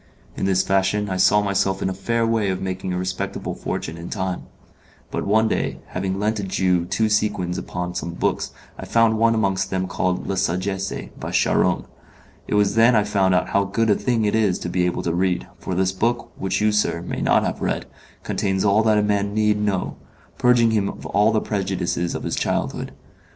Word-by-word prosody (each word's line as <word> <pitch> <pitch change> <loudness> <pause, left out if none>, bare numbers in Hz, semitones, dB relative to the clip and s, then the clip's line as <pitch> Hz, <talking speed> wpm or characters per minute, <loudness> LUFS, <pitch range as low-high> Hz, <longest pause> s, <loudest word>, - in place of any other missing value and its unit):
In - - -2
this 95 -1 +2
fashion 95 +1 +1
I 95 - -1
saw 105 +3 +4
myself 100 -1 0
in - - -1
a 95 - -1
fair 115 +5 0
way 115 -3 +1
of 95 -1 -1
making 95 0 -3
a 90 - -1
respectable 95 +2 -3
fortune 80 +2 -4
in 85 - -7
time; 95 -3 -3 0.7
but - - -3
one, 110 +2 +4
day, - - -1
having 95 +1 -2
lent 105 +2 0
a - - -3
Jew 90 -2 +1
two 100 +5 +1
sequins 105 -4 0
upon 90 0 -4
some 85 -1 -4
books, - - -1 0.3
I - - -6
found 115 -1 +3
one 115 0 +4
amongst 95 -3 0
them 95 -1 -1
called 90 0 -1
'La - - -2
Sagesse,' 95 +3 -2
by - - -5
Charron. - - +2 0.6
It - - -1
was 100 -1 +3
then 115 +2 +5
I 105 - +4
found 95 -3 +2
out 90 - +1
how 100 - +2
good 110 +3 +1
a - - +5
thing 115 -2 0
it 105 - +1
is 105 -5 +2
to 85 - -3
be 90 0 +1
able 90 - -2
to 85 - -1
read, 90 0 0
for 95 - -4
this 95 +1 +2
book, 115 +5 -1
which 95 +1 -2
you, 105 0 +3
sir, 105 -5 0
may - - -4
not - - +3
have - - -3
read, - - -1 0.4
contains 95 0 -1
all 100 +2 +4
that 110 -1 +3
a 105 - +3
man 100 0 0
need 105 -1 +2
know 100 -3 -1 0.4
purging 120 -2 +4
him 105 -3 +1
of - - -9
all 105 +2 +3
the 110 - +1
prejudices 95 -4 -2
of - - -4
his - - -2
childhood. - - -2
100 Hz, 210 wpm, -22 LUFS, 95-105 Hz, 0.7 s, then